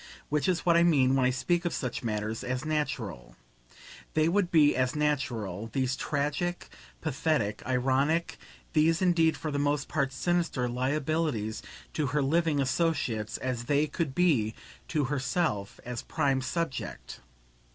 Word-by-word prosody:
which 150 +4 +1
is 180 -2 0
what 170 -1 +5
I 170 - +6
mean 140 -7 +4
when 130 -2 +3
I - - +3
speak 170 +7 0
of 175 - -1
such 125 -3 -3
matters 110 0 -2
as 125 +2 -3
"natural." 130 - -3 0.8
They 155 0 +4
would 180 +1 +2
be 150 -4 +5
as 130 +1 +1
natural, 120 -9 -1
these 130 -1 0
tragic, 150 +6 -2 0.3
pathetic, 125 -8 0
ironic, 135 +6 +1 0.3
these 160 +1 +3
indeed 170 -3 +3
for 155 - -4
the 140 - -1
most 145 -1 0
part 140 -3 0
sinister, 170 -5 0
liabilities, 130 -2 -1 0.3
to 150 -3 0
her 145 +2 +1
living 160 +1 +2
associates, 130 -6 0
as 125 -2 -3
they 145 +3 +2
could 150 -3 -3
be 135 -12 +2 0.3
to 150 -2 0
herself 130 - -1
as 125 -1 -4
prime 135 -4 0
subject. 135 0 -4
140 Hz, 145 wpm, -29 LUFS, 125-160 Hz, 0.8 s, I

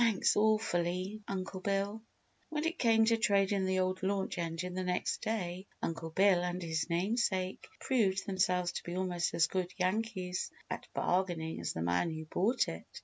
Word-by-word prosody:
"Thanks, 225 -5 +3
awfully, 200 -2 +1
Uncle 190 0 -4
Bill!" 200 +2 -1 0.5
When 305 0 -2
it 335 +2 -1
came 225 -2 +5
to 230 0 +4
trading 200 -2 +2
the 190 0 +1
old 185 0 -1
launch 190 -1 -1
engine 170 +2 -3
the 185 0 -2
next 180 0 -1
day 190 -4 -2
Uncle 165 0 -3
Bill 190 +1 +4
and 180 0 -2
his 165 -1 -2
namesake 190 +1 0
proved 195 -7 +1
themselves 180 -2 +1
to - - -5
be 175 - -5
almost 180 -2 0
as 165 - +5
good 180 +1 -2
Yankees 185 -1 -1 0.2
at - - -4
bargaining 175 -3 0
as 85 - -2
the 80 - -3
man 90 - +1
who 160 0 -5
bought 200 +9 +1
it. 80 0 -6
185 Hz, 170 wpm, -33 LUFS, 175-205 Hz, 0.5 s, came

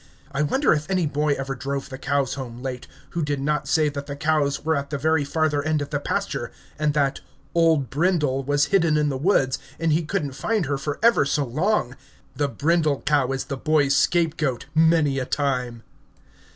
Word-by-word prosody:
I 140 +1 -1
wonder 265 - +2
if 155 +2 -3
any 185 -3 +1
boy 150 0 +1
ever 135 0 -4
drove 140 +2 -4
the 130 -1 -8
cows 140 -2 0
home 125 -2 -7
late, 130 -2 -5 0.2
who 170 - -2
did 145 -2 -1
not 150 +1 -1
say 155 -2 +3
that 140 -1 -5
the 140 - -5
cows 145 -1 0
were 160 0 +2
at 140 0 -3
the 145 - -2
very 160 +1 +2
farther 150 0 0
end 155 +1 0
of 145 0 -5
the 145 - 0
pasture, - - -3 0.3
and 150 -1 +1
that 140 -2 +1 0.3
"Old 165 -5 +2
Brindle" 150 -4 +1
was 145 +2 +2
hidden 165 -5 +4
in 150 -1 +2
the 135 - -2
woods, 135 -3 +2 0.2
and 165 -1 +1
he 160 - +2
couldn't 155 -3 -2
find 215 +5 -1
her 140 -1 -2
for 145 +1 -3
ever 235 -8 +5
so 140 +1 0
long! 135 - 0 0.4
The 145 - 0
brindle 155 -1 +1
cow 140 -3 +2
is 135 0 -2
the 140 - -5
boy's 145 -1 +2
scapegoat, 155 -5 +1
many 160 -3 +3
a 130 - -2
time. 125 -5 -2
145 Hz, 200 wpm, -23 LUFS, 135-155 Hz, 0.4 s, ever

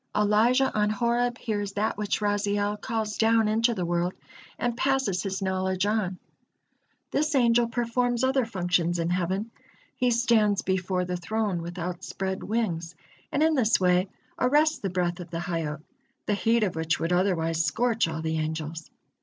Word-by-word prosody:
Elijah 225 +6 +3
on 210 0 +2
Horeb 235 +3 0
hears 205 -3 -3
that 210 +2 0
which 210 0 -2
Raziel 205 0 0
calls 220 -3 -3
down 225 0 +4
into 225 +2 +2
the 180 -3 -2
world, 175 +1 -1 0.4
and 240 -1 -1
passes 265 -8 +1
his 195 0 -3
knowledge 190 0 0
on. 205 -3 0 0.9
This 305 +1 0
angel 235 -2 +4
performs 240 +1 0
other 265 0 +3
functions 180 -5 0
in 170 0 -1
heaven. 185 +5 -1 0.4
He 250 -1 +1
stands 230 -4 +3
before 185 -1 0
the 180 0 -3
Throne 205 -1 -2
with 170 +2 -7
outspread 180 +2 -4
wings, 180 -7 -2 0.4
and 290 - +2
in 320 0 +4
this 230 -6 +3
way 180 +1 +2 0.3
arrests 300 +4 +3
the 195 - -2
breath 175 -1 -1
of 175 - -8
the 165 -1 -4
Hayyot, 160 -3 -3 0.4
the 210 - +1
heat 225 +3 +2
of 185 -5 -1
which 160 0 0
would 165 +2 0
otherwise 165 -3 +1
scorch 225 +6 +1
all 160 0 -4
the 160 0 -1
angels. 160 +1 -4
205 Hz, 160 wpm, -26 LUFS, 175-230 Hz, 0.9 s, down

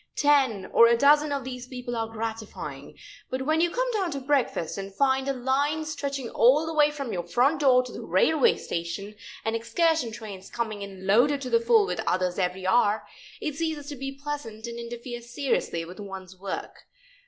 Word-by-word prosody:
Ten 270 -9 +3
or 235 - +8
a 235 0 +4
dozen 295 +3 +5
of 280 -2 -1
these 250 -1 -7
people 250 -1 -5
are 225 -1 -1
gratifying, 225 -1 -6 0.3
but 260 +1 -2
when 310 +3 +2
you 345 - +3
come - - 0
down 395 -6 0
to 280 -3 -3
breakfast 265 - 0
and 195 0 -6
find 265 +4 +1
a - - +2
line 280 +5 0
stretching 280 -4 -3
all 280 +7 +5
the 325 - -3
way 300 -1 +5
from 280 -5 -5
your 175 - -1
front 245 - +2
door 255 -3 +5
to 250 - -9
the - - -7
railway 255 - +3
station, 170 +5 -4 0.3
and 225 0 0
excursion 315 +2 +1
trains 210 -4 -9
coming 220 -3 -3
in 195 -1 -8
loaded 245 +9 +4
to 255 - -5
the 465 - +5
full 465 -3 +4
with - - -3
others 180 0 0
every 185 0 -1
hour, 210 +1 +3 0.3
it 300 - -3
ceases 315 -3 -3
to 290 - -5
be 270 +1 -5
pleasant 240 -7 -5
and 235 0 -6
interferes 235 0 -7
seriously 240 -10 -1
with 180 +4 -11
one's 190 -2 -8
work. 190 +1 -7
250 Hz, 195 wpm, -26 LUFS, 210-290 Hz, 0.3 s, or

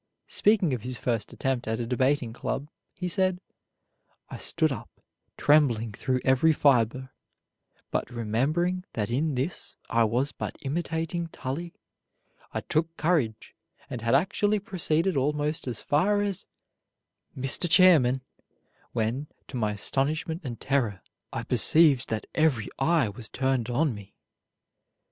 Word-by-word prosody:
Speaking 200 -8 +3
of 125 - -2
his 125 +2 -5
first 115 -3 -2
attempt 130 -3 -2
at 110 +1 -1
a 120 - -2
debating 130 0 +1
club, 140 +4 -4 0.2
he 180 - -5
said: 185 0 +1 0.9
"I - - -5
stood - - +1
up, - - -6 0.5
trembling 125 -7 +3
through 130 +4 -1
every 130 +5 +4
fiber; 130 -2 +2 0.8
but - - -1
remembering 140 +11 0
that 110 0 -2
in 145 +4 0
this 135 +8 -4 0.2
I 115 0 +4
was 125 +6 0
but - - -5
imitating 165 +3 -2
Tully, 165 +3 -5 0.8
I - - -3
took 165 +1 -1
courage 150 -10 0 0.4
and 120 - -4
had 115 +3 +2
actually 205 +7 +2
proceeded 185 -3 0
almost 150 +2 0
as 120 -4 -3
far 205 +8 +2
as 200 -3 -3 0.9
'Mr. 135 +6 0
Chairman,' 155 -9 +6 0.7
when, 120 +5 -1 0.2
to - - -8
my 105 -3 0
astonishment 150 - -1
and 120 -5 -6
terror, 130 -8 0 0.3
I - - -3
perceived 150 -5 +4
that 110 -1 -2
every 150 -9 +2
eye 150 -4 +3
was 110 +2 -7
turned 130 -3 0
on 140 +3 +1
me. 105 -2 -12
135 Hz, 135 wpm, -27 LUFS, 120-165 Hz, 0.9 s, Chairman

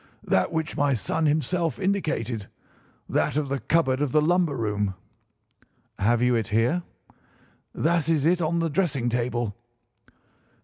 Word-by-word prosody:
"That 95 - +1
which 160 -1 -2
my 145 -2 +2
son 150 +9 0
himself 165 +3 0
indicated—that 150 - -3
of 150 -2 -1
the 140 0 -1
cupboard 140 -5 +1
of 145 -3 0
the 155 - +4
lumber 165 -2 +2
room." 105 -3 -1 1.0
"Have 115 +4 +2
you 125 0 +3
it 115 -3 0
here?" 115 +10 +1 0.9
"That 165 0 +1
is 155 -3 +2
it 175 +2 +3
on 165 +1 0
the 165 -1 0
dressing 145 -8 0
table." 120 -2 -1
145 Hz, 135 wpm, -25 LUFS, 120-165 Hz, 1.0 s, the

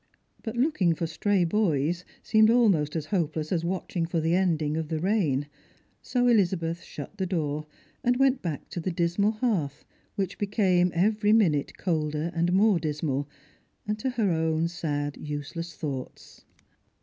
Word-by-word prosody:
But 220 +1 -5
looking 240 - +2
for 165 - -2
stray 190 +4 +1
boys 170 -3 +1 0.2
seemed 220 0 +5
almost 195 -12 +3
as 160 -2 -2
hopeless 160 -4 -1
aa 180 - +2
watching 175 -1 -2
for 170 0 -1
the 160 +1 +1
ending 160 -5 +1
of 160 -1 -2
the 160 0 -2
rain; 165 -7 +1 0.6
so 245 -1 0
Elizabeth 175 -7 +2
shut 145 - -9
the 190 - 0
door, 155 -4 -2 0.4
and 245 0 +2
went 270 0 +3
back 160 -5 -4
to 175 - -4
tlie 175 0 -3
dismal 175 +6 +1
hearth, 200 - -1 0.3
which 195 -2 -3
became 190 -4 +2
every 210 +4 +3
minute 165 -11 +2
colder 155 -2 -1
and 170 +1 +1
more 195 0 +4
dismal, 145 -3 -2 0.6
and 210 0 -1
to 260 - -1
her 225 -6 +1
own 160 0 +1
sad 145 -4 -3
useless 150 +3 -5
thoughts. 135 -4 -7
170 Hz, 155 wpm, -27 LUFS, 155-205 Hz, 0.6 s, seemed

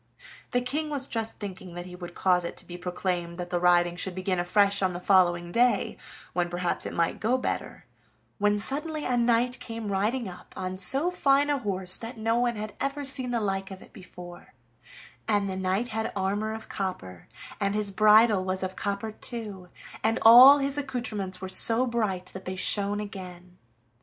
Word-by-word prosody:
The 245 - 0
King 300 +5 -3
was 280 -3 -1
just 225 -3 -3
thinking 185 -3 -8
that 175 0 -6
he 180 0 -10
would 175 -1 -9
cause 180 -2 +2
it 170 - -6
to - - -12
be 175 - -9
proclaimed 180 -1 -4
that 180 -1 -6
the 175 - 0
riding 175 -1 +3
should 180 0 -3
begin 185 -1 -2
afresh 200 +3 +2
on 185 -2 +1
the 175 - -5
following 175 -2 +2
day, 245 +5 +1 0.4
when 175 -1 -1
perhaps 175 0 -2
it - - -6
might 170 0 -1
go 240 +4 +1
better, 255 - -4 0.5
when 205 0 +2
suddenly 300 +7 0
a 250 - 0
knight 240 +1 +1
came 225 -3 -6
riding 215 +5 -1
up 180 -1 -12
on 185 0 -4
so 275 - +1
fine 285 -4 +2
a 285 - 0
horse 190 -5 +1
that 230 +2 -8
no 225 +2 0
one 240 -1 0
had 215 0 -6
ever 280 +1 -2
seen 260 -2 -2
the 240 -1 0
like 195 -2 -2
of 190 -1 -10
it - - -19
before, 175 -4 -12 0.7
and 205 -2 +1
the 190 - -3
knight 190 +5 -1
had 220 0 -3
armor 205 +3 -1
of 220 0 -7
copper, 95 - -6 0.3
and 200 0 -1
his 210 -1 +1
bridle 215 0 +5
was 185 0 -1
of 185 0 -4
copper 205 +1 -3
too, 210 -5 -7 0.3
and 225 +2 +1
all 250 +5 +10
his 280 0 -1
accoutrements 220 -9 -4
were 190 - -5
so 225 +6 +6
bright 215 -7 -2
that 190 - -9
they 185 - -4
shone 200 +2 +1
again. 180 -3 -9
200 Hz, 190 wpm, -26 LUFS, 185-235 Hz, 0.7 s, all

